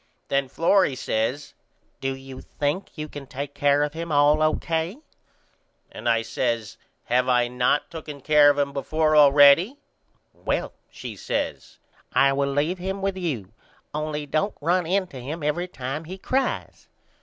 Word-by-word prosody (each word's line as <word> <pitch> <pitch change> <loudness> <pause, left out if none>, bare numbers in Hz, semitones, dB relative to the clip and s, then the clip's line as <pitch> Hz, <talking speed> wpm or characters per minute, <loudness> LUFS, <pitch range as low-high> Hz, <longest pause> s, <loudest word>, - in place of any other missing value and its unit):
Then 140 -1 +1
Florrie 165 0 +2
says 130 +4 -2 0.5
Do 135 0 -2
you 135 -1 -10
think 150 +7 -3
you 155 0 -4
can 145 -2 -9
take 140 +2 -6
care 145 0 +3
of 150 - -2
him 165 0 -5
all 145 +1 +4
O.K.? 160 +5 0 0.9
And 120 - -3
I 115 -1 +2
says 115 -2 -2 0.3
Have 125 +1 +1 0.3
not 125 +3 +2
I - - -17
tooken 150 -4 -8
care 150 -1 +6
of 145 - +2
him 140 -1 0
before 155 +3 0
allready? 145 - +6 0.6
Well, - - -2 0.2
she - - -8
says, - - -4 0.4
I 135 0 +4
will 140 0 0
leave 150 +6 0
him 190 +2 -4
with 195 -1 0
you 135 - -4 0.4
only 150 0 -3
don't 155 +8 -1
run 175 +2 +1
in 190 +2 +1
to 135 -8 -10
him 150 +5 -6
every 150 +5 -1
time 145 -1 -5
he 185 +4 -7
cries. 265 +7 -2
145 Hz, 155 wpm, -24 LUFS, 135-165 Hz, 0.9 s, care